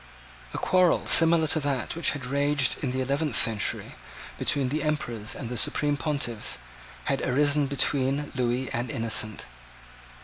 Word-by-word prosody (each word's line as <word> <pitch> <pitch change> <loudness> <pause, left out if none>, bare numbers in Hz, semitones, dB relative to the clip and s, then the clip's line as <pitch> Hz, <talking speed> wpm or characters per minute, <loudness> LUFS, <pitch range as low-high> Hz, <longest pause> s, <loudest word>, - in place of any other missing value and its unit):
A - - -6
quarrel 185 -2 +2
similar 165 -1 +5
to 155 - +2
that 140 -2 -3
which 170 - 0
had 130 - -8
raged 140 +1 0
in 135 - -1
the 130 +1 -3
eleventh 140 0 -1
century 110 -3 +2 0.5
between 135 -3 0
the 150 +3 -2
Emperors 120 -8 -3
and 125 - -7
the 125 +1 -5
Supreme 145 +6 +2
Pontiffs 140 -7 -1 0.5
had 135 -1 -2
arisen 145 +2 +2
between 140 +1 -1
Lewis 125 0 -2
and 120 +1 -3
Innocent. 110 -2 -1
140 Hz, 145 wpm, -25 LUFS, 125-150 Hz, 0.5 s, similar